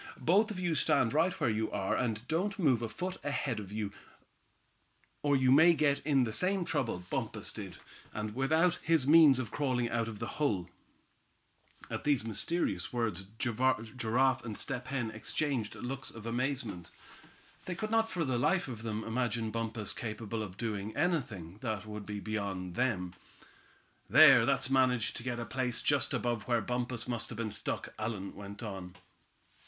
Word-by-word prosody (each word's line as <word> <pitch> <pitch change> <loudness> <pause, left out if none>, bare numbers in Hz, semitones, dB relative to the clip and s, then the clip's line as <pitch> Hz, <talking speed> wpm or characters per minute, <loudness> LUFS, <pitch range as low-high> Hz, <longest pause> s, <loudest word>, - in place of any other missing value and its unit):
"Both 205 +7 +3
of 205 -4 -5
you 175 -2 0
stand 120 -5 +2
right 180 +5 +2
where 150 - +1
you 110 +1 -1
are, 95 -2 -1
and 115 0 -2
don't 195 +7 -1
move 135 - +3
a 115 - -2
foot 180 +11 -4
ahead, 140 -5 -1 1.6
or 145 -1 +3
you 130 -1 +4
may 160 +5 +7
get 145 -2 +2
in 140 -3 +2
the 110 -3 -2
same 185 - +1
trouble 115 - -1
Bumpus - - -2
did, - - -8 0.3
and 105 0 -4
without 160 +7 +2
his 165 -5 +2
means 150 -2 +7
of 125 -4 -3
crawling 130 -5 0
out 115 -1 0
of 110 -2 -6
the - - -4 0.2
hole." 95 - 0 1.2
At - - -5
these 140 -6 +2
mysterious 110 - -1
words 110 -6 -2
Giraffe 125 +1 +1
and 110 -3 -5
Step 125 -2 -3
Hen 125 -5 -2
exchanged 115 +1 -1
looks 130 +1 -5
of 115 -1 -10
amazement. 120 - -2 0.8
They 180 - -3
could 215 +5 -4
not 225 0 +3
for 170 -6 -1
the 130 -3 0
life 185 +5 +2
of 120 -4 -6
them 110 -1 -3
imagine 115 -1 -1
Bumpus 115 -2 -2
capable 110 0 -4
of 95 -3 -7
doing 110 -1 -3
anything 120 - -1
that 110 -4 -3
would 105 -1 -7
be 105 -1 -4
beyond 100 -4 -3
them. 90 -7 -1 1.0
"There, - - +8
Thad's - - +2
managed 130 -4 +2
to - - -5
get 125 -1 -2
to 120 - -4
a - - -7
place 125 0 -1
just - - +2
above 120 -3 -1
where 120 -1 +3
Bumpus 125 -1 -3
must 120 -2 0
have - - -7
been 115 -2 -2
stuck," - - -3
Allan 110 -3 -3
went 100 +2 -9
on. 95 -4 -6
120 Hz, 170 wpm, -32 LUFS, 110-140 Hz, 1.6 s, There